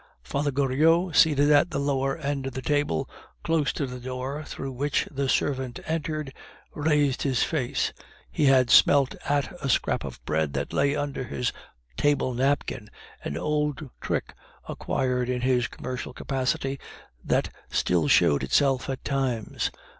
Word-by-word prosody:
Father 145 +1 -1
Goriot, 155 +6 +2
seated 145 -2 +5
at 150 +4 +5
the - - -3
lower 135 0 0
end 140 -3 -2
of 135 - -5
the 130 - -3
table, 145 - 0 0.4
close 160 -3 +1
to 140 - -2
the 125 -1 -7
door 130 +4 -4
through 135 -2 -6
which 140 +3 -1
the 140 -2 -1
servant 130 -3 0
entered, 155 -3 -3 0.4
raised 145 -3 +1
his 130 -4 +1
face; 135 -7 -1 0.4
he 145 - +1
had 130 -3 +5
smelt 140 -2 +6 0.2
at 145 +2 +1
a 135 - -1
scrap - - +1
of - - -7
bread 75 -2 0
that - - -3
lay 140 +1 +2
under 145 -2 -3
his 125 0 -2 0.4
table 145 -3 +2
napkin, 130 -3 -1 0.3
an 70 - -4
old 150 -2 -1
trick - - -2 0.3
acquired 125 -1 -1
in 125 -1 -1
his 125 -2 +2
commercial 125 -1 -6
capacity, 135 0 -2 0.4
that - - 0 0.2
still 85 -4 +1
showed 70 0 +4
itself 130 - +2
at 135 0 -4
times. 130 -6 -1
135 Hz, 150 wpm, -26 LUFS, 125-145 Hz, 0.4 s, smelt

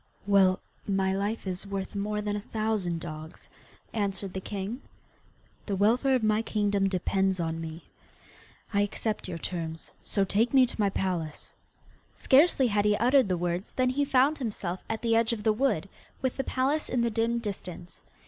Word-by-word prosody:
'Well, 195 -2 +4 0.3
my 195 -1 +1
life 205 +3 -2
is 185 +1 -4
worth 195 -1 -4
more 210 +1 -2
than 205 0 -2
a 205 - -3
thousand 215 -6 -1
dogs,' 155 -1 -9 0.4
answered 195 -3 -2
the 190 - -4
king, 205 +6 -5 0.9
'the 200 - 0
welfare 240 +7 +3
of 250 - 0
my 215 0 +3
kingdom 205 -3 +1
depends 190 0 0
on 165 -1 -2
me. 160 +1 -7 0.9
I 200 - +3
accept 210 +1 -2
your 175 -2 -4
terms, 165 -1 -5
so 200 - 0
take 220 +7 +1
me 260 -1 +8
to 240 - -6
my 200 - +3
palace.' 175 -5 -3 0.6
Scarcely 275 0 +5
had 205 -3 +2
he 210 0 +3
uttered 250 -1 +4
the 180 - +1
words 175 +2 -2
than 255 -1 +2
he 285 +3 +1
found 280 +2 +3
himself 200 -7 -3
at 225 +1 -3
the 230 -1 +3
edge 230 0 +3
of 210 -2 -5
the 220 -1 +4
wood, 215 - +1 0.3
with 260 -1 -1
the 270 - -1
palace 270 +4 0
in 250 - +1
the 235 0 +1
dim 230 +2 +1
distance. 185 -6 -6
205 Hz, 175 wpm, -28 LUFS, 190-230 Hz, 0.9 s, me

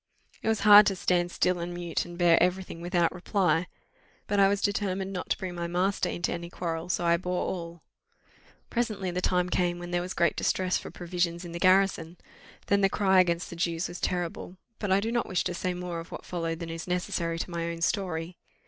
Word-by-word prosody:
It - - -5
was 220 -1 +1
hard 210 0 +9
to 195 - +1
stand 175 -1 +1
still 180 0 +1
and 175 +1 -4
mute, 175 -2 -2
and 175 0 -9
bear 175 -2 +5
every 180 +2 +2
thing, 165 -2 -9
without 175 -1 +1
reply. 180 -2 +1 0.6
But 205 0 0
I 195 - +7
was 200 0 +1
determined 195 -2 -1
not 180 - -5
to - - +1
bring 185 -1 -5
my 170 -1 -3
master 185 +3 0
into 175 - -2
any 170 0 -6
quarrel, 170 -1 -4
so 175 - 0
I 170 0 +4
bore 180 +1 -2
all. 170 -2 -5 0.9
Presently 215 -6 -1
the 180 +1 -2
time 180 -1 +1
came 175 -1 +1
when 175 0 -7
there 175 0 +1
was 180 +1 -5
great 170 -2 +2
distress 185 -1 0
for - - -3
provisions 175 0 -2
in 170 - -7
the 170 - -5
garrison; 185 -2 +3 0.5
then 200 0 +2
the 195 - +4
cry 190 -2 +3
against 170 -1 +1
the - - -6
Jews 170 0 -1
was 175 - -8
terrible: 175 +1 -3 0.2
but 205 -3 -2
I 195 +1 +4
do 225 +2 -2
not 240 0 0
wish 185 - +1
to - - -2
say 180 +1 -2
more 175 -1 -4
of 165 - -10
what - - -8
followed 165 -2 -3
than 165 -1 -6
is 165 +1 -6
necessary 170 -2 -1
to 175 - -4
my 170 -1 -2
own 165 0 -6
story. 175 -2 -1
180 Hz, 225 wpm, -28 LUFS, 170-190 Hz, 0.9 s, hard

